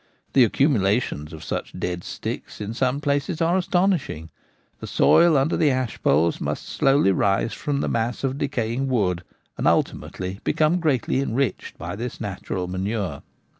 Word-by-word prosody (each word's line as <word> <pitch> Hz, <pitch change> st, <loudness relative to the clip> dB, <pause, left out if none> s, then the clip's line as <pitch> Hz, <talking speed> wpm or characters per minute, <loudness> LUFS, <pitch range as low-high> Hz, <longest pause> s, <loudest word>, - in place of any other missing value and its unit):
The 130 Hz, -, +7 dB
accumulations 105 Hz, -, +1 dB
of 80 Hz, -2 st, -9 dB
such -, -, -4 dB
dead 90 Hz, -1 st, -3 dB
sticks -, -, -6 dB
in 105 Hz, +1 st, -4 dB
some 130 Hz, +3 st, 0 dB
places 145 Hz, +3 st, 0 dB
are 170 Hz, +1 st, +2 dB
astonishing: 175 Hz, -, 0 dB, 0.5 s
the -, -, -7 dB
soil 170 Hz, -3 st, +5 dB
under 135 Hz, +4 st, +2 dB
the 155 Hz, -, +3 dB
ash 130 Hz, -3 st, -2 dB
poles 80 Hz, +4 st, +2 dB
must -, -, -3 dB
slowly 135 Hz, -7 st, +3 dB
rise 100 Hz, +3 st, +1 dB
from 140 Hz, -1 st, -2 dB
the -, -, -1 dB
mass 115 Hz, +3 st, -1 dB
of 135 Hz, +1 st, -1 dB
decaying 125 Hz, 0 st, -1 dB
wood 95 Hz, -9 st, 0 dB, 0.4 s
and -, -, +1 dB
ultimately 95 Hz, +1 st, -1 dB
become 160 Hz, +3 st, +2 dB
greatly 140 Hz, -6 st, +1 dB
enriched 135 Hz, -3 st, -1 dB
by 85 Hz, +3 st, -5 dB
this 120 Hz, +3 st, -5 dB
natural 95 Hz, -3 st, -4 dB
manure. 95 Hz, -3 st, -3 dB
120 Hz, 155 wpm, -23 LUFS, 95-140 Hz, 0.5 s, The